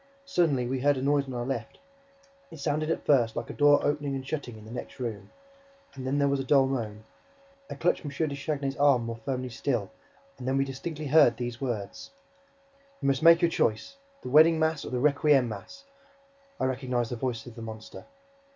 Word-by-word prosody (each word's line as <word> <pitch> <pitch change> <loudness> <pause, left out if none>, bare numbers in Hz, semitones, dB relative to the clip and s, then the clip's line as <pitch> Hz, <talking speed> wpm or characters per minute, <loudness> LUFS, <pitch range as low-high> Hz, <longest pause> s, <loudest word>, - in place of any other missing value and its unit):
Suddenly, 165 - +1
we 130 +2 -2
heard 145 +1 +2
a - - -3
noise 140 0 +2
on 130 - -6
our 120 0 -3
left. 120 -4 -4 0.7
It - - -11
sounded 155 +2 -1
at 165 - -2
first 120 -6 +3
like - - -4
a - - -8
door 145 -1 +5
opening 145 -1 -1
and 130 -1 -6
shutting 125 -7 -5
in 110 - -13
the 110 - -11
next 125 - -8
room; 115 -5 -5 0.6
and 130 -1 -7
then 135 +2 0
there 140 -1 +3
was 140 0 +1
a - - -2
dull 135 0 +4
moan. 110 -5 -3 0.7
I - - -5
clutched 175 - 0
M. 145 - -4
de 145 +1 -2
Chagny's 140 -1 -3
arm 140 -5 +4
more 115 0 -5
firmly 130 +2 -4
still; 115 - -2 0.5
and 125 - -6
then 135 +1 +1
we 135 - +2
distinctly 150 +3 -6
heard 145 -5 +5
these 120 0 -5
words: 115 -7 -4 0.9
"You 140 - 0
must 135 -1 +1
make 165 +1 +7
your 170 - +4
choice! 165 - -1 0.3
The - - -5
wedding 160 +3 +7
mass 160 -2 0
or - - -6
the 125 - -2
requiem 140 -1 +3
mass!" 115 - -9 0.8
I - - +1
recognized 125 -2 -1
the - - -2
voice 120 -1 -3
of 120 - -10
the 115 - -10
monster. 110 -1 -9
135 Hz, 205 wpm, -28 LUFS, 120-145 Hz, 0.9 s, make